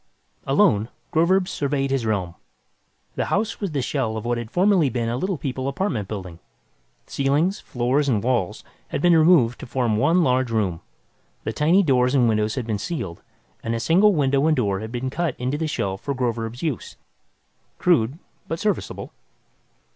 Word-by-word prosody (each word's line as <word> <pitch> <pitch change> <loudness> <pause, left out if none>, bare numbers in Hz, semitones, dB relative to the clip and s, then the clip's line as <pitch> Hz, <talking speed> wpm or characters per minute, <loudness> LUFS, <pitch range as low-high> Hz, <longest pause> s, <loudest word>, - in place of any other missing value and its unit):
Alone, 105 +2 +3 0.2
Groverzb 180 +3 +3
surveyed 140 -3 -1
his 130 -4 0
realm. 95 -6 -1 0.8
The - - -1
house 220 +3 -1
was 200 - -1
the 140 -5 -2
shell 120 -4 -1
of 110 - -6
what 120 0 0
had 115 -2 -6
formerly 180 - +3
been 115 -1 -2
a 120 - -1
Little 185 +7 -2
People 130 -2 -3
apartment 135 - -2
building. 95 -5 -7 0.7
Ceilings, 145 +8 0
floors 130 +4 0
and 110 -5 +1
walls 120 -7 -1 0.2
had - - -3
been 175 +3 +4
removed 155 -7 +4
to - - -8
form 120 -4 0
one 165 +9 +3
large 130 -2 +2
room. 100 -7 -1 0.6
The - - -3
tiny 170 +7 +3
doors 130 -3 +2
and 125 -3 +4
windows 110 -1 +1
had 130 -4 -3
been 110 -3 -2
sealed, 100 - -5 0.4
and 115 0 -2
a - - -2
single 190 - +4
window 140 0 +2
and 155 -2 +3
door 100 -6 0
had 110 +2 -6
been 130 +1 -3
cut 165 -2 -1
into 130 +4 -2
the 160 - -1
shell 95 -10 -2
for 140 +3 -3
Groverzb's 120 0 -3
use. 150 -8 -3 0.8
Crude, 145 -6 +2 0.3
but 165 - -3
serviceable. 210 -1 -2
130 Hz, 175 wpm, -23 LUFS, 115-160 Hz, 0.8 s, been